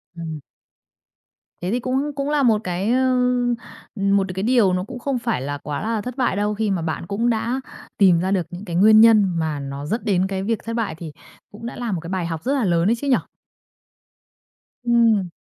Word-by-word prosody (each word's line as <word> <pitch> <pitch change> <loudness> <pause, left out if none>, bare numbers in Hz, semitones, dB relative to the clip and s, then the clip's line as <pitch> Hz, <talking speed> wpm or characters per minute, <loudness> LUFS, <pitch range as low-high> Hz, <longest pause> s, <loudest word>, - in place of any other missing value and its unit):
Ừm. 165 -2 -6 1.2
Thế 180 +3 -2
thì 245 - 0
cũng 265 +4 -1
cũng 280 +1 -2
là 295 -2 +2
một 220 -3 +3
cái, 185 +5 -1
ờ, 255 0 +2 0.8
một 195 -1 +2
cái 190 +2 -3
điều 230 -6 +3
nó 180 0 0
cũng 250 +3 -8
không 265 -1 -2
phải 230 - -1
là 145 +1 -3
quá 145 0 -5
là 220 0 -1
thất 250 +3 -7
bại 245 -6 +1
đâu 210 +1 0
khi 210 -1 -1
mà 180 -3 -1
bạn 160 +1 -3
cũng 230 +4 0
đã 235 +3 -1 0.4
tìm 185 -4 +5
ra 190 +2 -1
được 185 -5 +1
những 180 +3 -8
cái 170 -4 -5
nguyên 215 +4 +7
nhân 220 -3 +7
mà 155 -3 -2
nó 140 +1 -6
dẫn 225 +9 -2
đến 190 -2 +2
cái 190 0 -3
việc 225 +1 -1
thất 230 +1 -4
bại, 225 -9 -2
thì 160 -2 -8 0.4
cũng 225 +3 -10
đã 240 - -5
là 235 -3 -3
một 175 - -1
cái 170 - -8
bài 185 -2 -2
học 165 0 -4
rất 265 - 0
là 270 -6 +1
lớn 170 +1 +2
ấy 235 - +3
chứ 280 +4 -5
nhỉ? 260 - +5 1.7
Ừm. 230 -6 +3
205 Hz, 220 wpm, -22 LUFS, 175-235 Hz, 1.7 s, nguyên